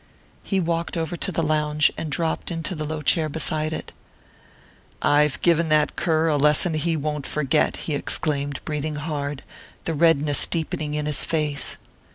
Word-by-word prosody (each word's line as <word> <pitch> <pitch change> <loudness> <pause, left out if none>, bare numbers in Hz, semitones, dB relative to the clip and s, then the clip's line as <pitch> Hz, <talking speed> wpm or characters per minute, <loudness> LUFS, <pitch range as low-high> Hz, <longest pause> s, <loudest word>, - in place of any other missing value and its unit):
He 195 - -1
walked 170 -1 -1
over 165 +1 -2
to 190 - -1
the 165 -1 -1
lounge 150 -1 +2
and 160 - -5
dropped 165 0 -1
into 165 0 -3
the 155 -3 -4
low 155 0 -4
chair 155 +1 +3
beside 155 0 -1
it. 160 - -6 1.1
"I've 150 -1 +3
given 170 -1 +3
that 150 -1 +2
cur 160 -1 +1
a 150 -2 +2
lesson 150 +4 +3
he 160 +1 0
won't 150 -1 -3
forget," 150 0 +1
he 155 - -2
exclaimed, 145 0 +1
breathing 150 0 -3
hard, 145 -2 -4 0.4
the 165 - -1
redness 150 -2 +3
deepening 155 -2 -3
in 150 0 -2
his 150 -1 +2
face. 150 -3 -1
155 Hz, 165 wpm, -23 LUFS, 150-165 Hz, 1.1 s, chair